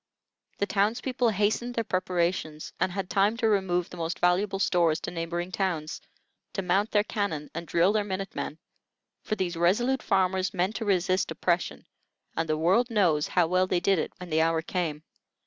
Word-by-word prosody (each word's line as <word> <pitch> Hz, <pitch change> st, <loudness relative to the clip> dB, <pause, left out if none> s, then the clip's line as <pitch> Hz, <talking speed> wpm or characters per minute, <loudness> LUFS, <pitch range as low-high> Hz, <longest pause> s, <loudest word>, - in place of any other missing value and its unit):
The 200 Hz, -, +1 dB
town's 205 Hz, +3 st, +1 dB
people 250 Hz, -2 st, 0 dB
hastened 220 Hz, +4 st, 0 dB
their 230 Hz, -, 0 dB
preparations, 175 Hz, -5 st, -1 dB
and 185 Hz, -, +1 dB
had 195 Hz, 0 st, -3 dB
time 200 Hz, +4 st, +2 dB
to 230 Hz, -, +1 dB
remove 190 Hz, -4 st, +1 dB
the 180 Hz, -, -9 dB
most 165 Hz, 0 st, -3 dB
valuable 190 Hz, +3 st, +2 dB
stores 170 Hz, -4 st, +2 dB
to -, -, -4 dB
neighboring 175 Hz, +1 st, -3 dB
towns; 170 Hz, -4 st, -2 dB, 0.5 s
to 195 Hz, -, -2 dB
mount 195 Hz, +4 st, +1 dB
their 210 Hz, -1 st, +3 dB
cannon 200 Hz, -9 st, -3 dB
and 170 Hz, -, -6 dB
drill 175 Hz, +6 st, +3 dB
their 215 Hz, -1 st, +2 dB
minute 195 Hz, -1 st, -4 dB
men; 155 Hz, -, -4 dB, 0.6 s
for 215 Hz, -, -2 dB
these 185 Hz, -4 st, -2 dB
resolute 225 Hz, +11 st, +2 dB
farmers 190 Hz, 0 st, +1 dB
meant 185 Hz, +4 st, 0 dB
to 225 Hz, -, -4 dB
resist 185 Hz, -1 st, +1 dB
oppression, 175 Hz, 0 st, -1 dB, 0.5 s
and 165 Hz, 0 st, -1 dB
the 155 Hz, -, +1 dB
world 190 Hz, +10 st, +3 dB
knows 175 Hz, -9 st, +2 dB
how 180 Hz, -2 st, +3 dB
well 185 Hz, +2 st, +2 dB
they 180 Hz, -1 st, +1 dB
did 195 Hz, 0 st, +2 dB
it -, -, -2 dB
when 180 Hz, -3 st, -9 dB
the 160 Hz, +1 st, +3 dB
hour 165 Hz, 0 st, +1 dB
came. 160 Hz, -4 st, -2 dB
185 Hz, 185 wpm, -27 LUFS, 170-200 Hz, 0.6 s, their